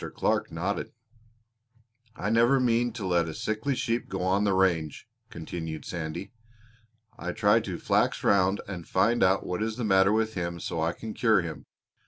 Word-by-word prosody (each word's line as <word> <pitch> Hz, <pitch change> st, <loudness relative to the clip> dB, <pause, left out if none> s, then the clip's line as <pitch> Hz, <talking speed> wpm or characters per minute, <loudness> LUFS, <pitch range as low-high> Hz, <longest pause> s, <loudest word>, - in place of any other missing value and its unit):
Clark -, -, 0 dB
nodded. 90 Hz, +5 st, -3 dB, 1.2 s
"I 105 Hz, -2 st, -2 dB
never 120 Hz, +4 st, +4 dB
mean 120 Hz, -1 st, +2 dB
to 110 Hz, -4 st, -5 dB
let 85 Hz, -2 st, +2 dB
a 80 Hz, -, -7 dB
sickly 110 Hz, +6 st, -2 dB
sheep 120 Hz, -2 st, -2 dB
go 95 Hz, -1 st, -3 dB
on 95 Hz, +3 st, +2 dB
the 100 Hz, -, +2 dB
range," 85 Hz, -5 st, 0 dB, 0.2 s
continued 80 Hz, -2 st, -6 dB
Sandy. 85 Hz, +4 st, -5 dB, 0.9 s
"I -, -, -4 dB
try 105 Hz, +1 st, +4 dB
to 95 Hz, -6 st, -5 dB
flax -, -, +1 dB
round 95 Hz, 0 st, +3 dB
and 90 Hz, -4 st, -7 dB
find 115 Hz, +6 st, +2 dB
out 95 Hz, +1 st, +3 dB
what 90 Hz, +2 st, -3 dB
is 110 Hz, 0 st, -1 dB
the 125 Hz, -, -3 dB
matter 95 Hz, -2 st, +4 dB
with 110 Hz, 0 st, +1 dB
him 85 Hz, -1 st, -3 dB
so 80 Hz, -, -3 dB
I 80 Hz, +1 st, 0 dB
can 110 Hz, -1 st, -7 dB
cure 110 Hz, -4 st, +3 dB
him. 80 Hz, -2 st, -7 dB
95 Hz, 175 wpm, -27 LUFS, 90-110 Hz, 1.2 s, never